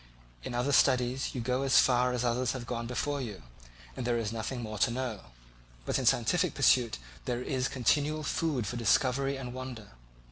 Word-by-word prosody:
In 120 - -5
other 125 +4 0
studies 125 0 +2
you 125 - -2
go 125 +2 0
as 135 -1 +3
far 125 0 +4
as 125 0 -1
others 125 +1 0
have 130 -3 -6
gone 115 0 -4
before 140 +3 -2
you, 105 -6 -7 0.5
and - - -4
there 120 0 +1
is 110 -2 -2
nothing 120 +2 -4
more 110 -1 -6
to - - +3
know; 120 - -4 0.6
but - - 0
in - - -2
a - - +2
scientific 175 +9 +2
pursuit 125 - +3 0.3
there 125 0 -2
is 130 -2 -1
continual 150 +4 +1
food 145 -6 -1
for 120 - -4
discovery 135 +4 +2
and 125 -2 -6
wonder. 130 -4 -7
125 Hz, 190 wpm, -30 LUFS, 120-135 Hz, 0.6 s, far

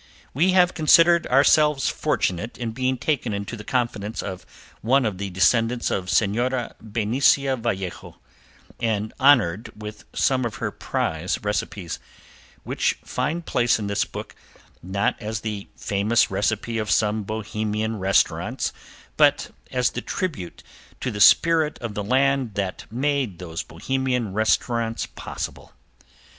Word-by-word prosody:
We 175 +7 +3
have 180 -1 +4
considered 170 +1 +5
ourselves 140 +1 +4
fortunate 95 +6 -1
in 115 -2 -3
being 130 +2 -1
taken 125 -4 -1
into 100 +3 -5
the 105 - -9
confidence 115 -3 -2
of 95 -2 -7 0.3
one 130 +3 +3
of 100 -4 -2
the 100 0 -3
descendants 115 +6 +2
of 95 -1 -2
Senora 115 +5 +1
Benicia 130 +5 +2
Vallejo, 100 -7 -4 0.6
and 110 -2 -1
honored 120 -8 +4
with 105 0 -8
some 130 -1 +1
of 115 -3 -3
her - - -3
prize 80 +4 -2
recipes, 105 -4 -3 0.6
which - - 0
find 165 +3 -2
place 120 -2 +2
in 105 - -4
this 100 0 0
book, - - -8 0.5
not 100 +3 -1
as 110 +1 -3
the 105 -2 -5
famous 105 +3 +1
recipe 110 +3 -1
of 110 -1 -3
some 105 +1 +2
Bohemian 110 +1 -3
restaurants 95 +1 +1 0.4
but - - +3 0.2
as 125 -1 +1
the - - -4
tribute 140 - -4 0.4
to 125 - -2
the 105 -1 -4
spirit 160 +5 +5
of 115 -3 -6
the 105 - -3
land 130 0 +1
that 95 -1 -4
made 130 -5 -1
those 85 -2 -5
Bohemian 125 +2 -2
restaurants 115 +2 0
possible. - - -7
115 Hz, 135 wpm, -23 LUFS, 100-130 Hz, 0.6 s, considered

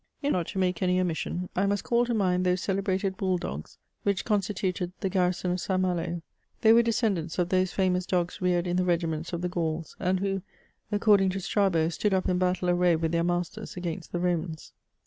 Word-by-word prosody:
In 285 - +1
fine, 185 - +2
not 170 - -4
to - - -6
make 180 -2 0
any 180 0 +2
omission, 180 0 -2
I 195 +2 +2
must 200 -1 0
call 240 0 +2
to 240 - 0
mind 185 -3 +2
those 180 0 +1
celebrated 195 0 -1
bull 185 -2 +1
dogs 75 - -6 0.2
which 200 -2 0
constituted 190 -4 -1
the 195 - -1
garrison 180 -1 +1
of 180 0 -1
St. 190 -1 0
Malo: 175 -2 -1 0.4
they 225 -1 +7
were 235 - +7
descendants 210 -8 0
of 180 -1 +1
those 185 0 +2
famous 185 -1 +1
dogs 175 -1 -1
reared 180 -1 +2
in 175 0 0
the 185 - +2
regiments 170 -2 -1
of 170 -1 -3
the - - +1
Gauls, 165 -2 -3
and 185 0 +1
who, 195 0 -1 0.5
according 205 -2 +4
to 190 +1 -2
Strabo, 185 -4 +2
stood 195 +3 0
up 185 - 0
in 180 0 +1
battle 180 0 +1
array 175 -1 +3
with 160 0 -1
their 170 0 +1
masters 175 +4 -2
against 175 -1 -5
the 175 - -2
Romans. 170 -2 -2
180 Hz, 210 wpm, -28 LUFS, 175-195 Hz, 0.5 s, they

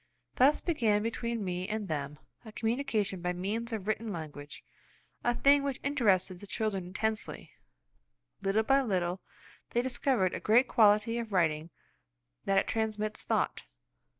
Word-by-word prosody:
Thus 275 +4 +5
began 225 -11 +1
between 230 -1 -2
me 180 0 -3
and 215 -1 -3
them 150 -2 -3 0.3
a 220 - -10
communication 225 -5 -1
by 180 +1 -1
means 215 +6 -3
of 210 -3 -4
written 215 0 -1
language, 150 -4 -8 0.6
a 240 0 +1
thing 280 +3 +5
which 275 -2 -3
interested 200 -10 +1
the 205 - -11
children 195 -4 -2
intensely. 220 +4 -3 0.9
Little 200 +3 +2
by 270 +4 +4
little, 185 -6 -1 0.5
they 240 - +2
discovered 250 -6 +1
the - - -4
great 240 +4 +4
quality 215 +1 +4
of 230 -2 -5
writing–that 160 - -3
it - - +3
transmits 215 -1 -2
thought. - - 0
215 Hz, 140 wpm, -30 LUFS, 185-235 Hz, 0.9 s, Thus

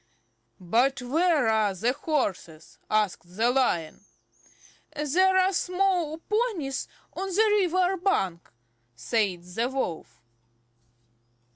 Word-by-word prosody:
"But 245 +10 +1
where 310 0 +2
are 215 -3 +2
there 230 +7 0
horses?" 200 - -3
asked 185 -5 -1
the 235 +2 +3
Lion. 195 -11 0 0.9
"There 360 +6 +2
are 375 +1 +3
small 360 -4 0
ponies 390 - -2 0.3
on 385 - -4
the 420 +3 +3
river 370 +1 +1
bank," 195 - -1 0.5
said 180 - -1
the 225 +8 -2
Wolf. 165 - -4
270 Hz, 100 wpm, -26 LUFS, -, 0.9 s, the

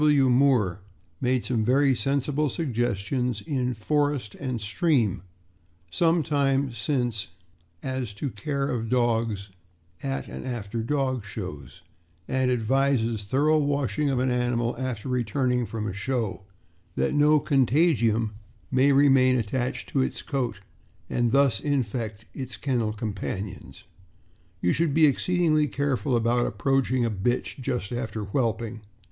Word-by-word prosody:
Gr. - - +4
W. 140 -3 +4
Moore 120 -8 +3 0.4
made 125 -1 +1
some 115 -4 0
very 135 +3 +3
sensible 140 +3 0
suggestions 120 - -1
in 125 +2 -1
Forest 145 -1 0
and 130 -4 -4
Stream 110 - +1 0.7
some 165 -1 +2
time 140 -3 +1
since 120 -3 -1 0.6
as 130 -4 -3
to 130 +6 -4
care 140 +6 -2
of 115 -2 -2
dogs 115 -5 0 0.5
at 135 -1 -3
and - - -7
after 115 -3 -4
dog 130 -1 -1
shows, 95 -8 -8 0.4
and 130 -1 +1
advises 120 -2 +1
thorough 150 +7 +3
washing 145 0 0
of 135 - 0
an 130 0 +1
animal 120 -1 0
after 130 -3 -3
returning 125 0 0
from 110 -2 -4
a 105 - -3
show, 100 -2 -2 0.5
that - - 0
no 150 +1 +5
contagium 125 - +2 0.4
may 130 +2 +4
remain 135 -2 +5
attached 125 +4 -2
to 135 - +1
its - - -2
coat 120 -8 -2 0.5
and 120 -1 +1
thus 135 -5 +3
infect 115 -6 -2
its 130 -6 -6
kennel 120 -6 0
companions. 105 -2 -5 0.8
You 90 - +2
should 165 -4 +1
be 160 -1 +6
exceedingly 155 +1 +2
careful 140 -2 0
about 120 +1 +2
approaching 135 -2 +1
a 115 - 0
bitch 115 +7 -1
just 125 -7 -3
after 115 -3 -3
whelping. 115 0 -2
125 Hz, 130 wpm, -26 LUFS, 115-140 Hz, 0.8 s, be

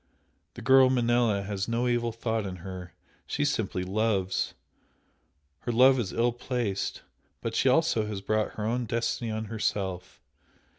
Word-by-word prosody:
The - - -8
girl 130 -1 +7
Manella 120 -5 +2
has 100 -1 -3
no 120 +1 0
evil 120 -1 +1
thought 115 -1 -2
in 95 - -5
her 90 -2 -8 0.3
she - - 0
simply 90 - -1
loves! 95 -1 0 1.0
her 120 - -3
love 130 +3 +6
is 100 -6 -2
ill 120 +1 +2
placed, 120 -4 -3 0.4
but - - -4
she - - +3
also 110 -2 +2
has 105 -2 -4
brought 110 +1 0
her 105 - -3
own 120 +1 -1
destiny 115 +1 -1
on 110 0 -3
herself. 100 -4 -3
110 Hz, 150 wpm, -28 LUFS, 100-120 Hz, 1.0 s, girl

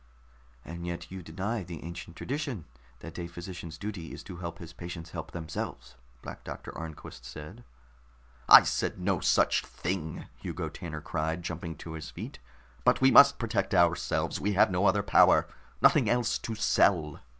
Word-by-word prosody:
"And 85 +1 -6
yet 85 0 -5
you 95 0 -6
deny 95 +7 -3
the 85 -2 -8
ancient 85 0 -8
tradition 135 - -4 0.4
that - - -8
a 85 - -4
physician's 85 -1 -8
duty 95 -4 -6
is - - -8
to 90 -3 -9
help 85 -1 -6
his 85 -1 -10
patients 85 -2 -8
help - - -6
themselves," 80 -2 -6 0.3
Black - - -8
Doctor - - -8
Arnquist 80 -6 -8
said. 75 - -9 0.9
"I - - +12
said - - -1
no 90 -1 0
such - - +3
thing!" 85 -4 -4
Hugo - - -4
Tanner 80 -3 -7
cried, 80 +4 -2
jumping 85 -1 -5
to 80 - -9
his 80 -1 -7
feet. 65 - -8 0.4
"But - - +4
we 130 0 +5
must 140 0 +8
protect 110 -5 -1
ourselves. 85 -2 +2
We 105 +1 +1
have 95 0 +4
no 95 +2 +2
other 100 +1 +3
power, - - +5 0.4
nothing - - +5
else 120 -2 +1
to 115 - -5
sell." 85 -7 +2
85 Hz, 165 wpm, -29 LUFS, 80-100 Hz, 0.9 s, I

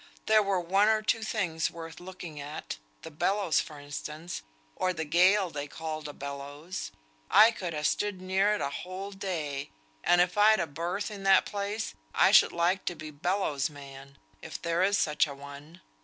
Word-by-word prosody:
There 215 0 +5
were 195 -2 +1
one 195 +4 +3
or 220 0 +3
two 225 - +1
things 180 -7 -1
worth 165 -1 -9
looking 175 -4 -9
at, 145 - -6 0.3
the - - -8
bellows 180 +2 +1
for 150 -2 -9
instance, 150 +4 -6 0.3
or 185 0 0
the 160 -2 -3
gale 180 +4 +4
they 145 -1 -4
called 155 0 -5
a - - -5
bellows. 145 +6 -6 0.4
I 225 +2 +8
could 180 -7 -5
ha' 150 - -3
stood 205 +3 0
near 190 +3 +2
it - - -4
a 140 - -1
whole 185 +6 -6
day; 165 -8 -4 0.3
and 175 - +4
if 180 +3 +2
I'd 215 +1 +6
a 170 - +1
berth 170 +8 -3
in 205 -2 -7
that 195 -1 +6
place, 205 +2 -3 0.2
I - - +5
should - - +7
like 175 +3 +1
to 175 - -2
be 155 -1 -8
bellows 150 -2 0
man, 140 -1 -12 0.2
if 160 - -7
there 170 +1 0
is 200 +2 +3
such 150 0 +2
a 140 - -7
one. 145 +4 -11
175 Hz, 185 wpm, -29 LUFS, 150-195 Hz, 0.4 s, I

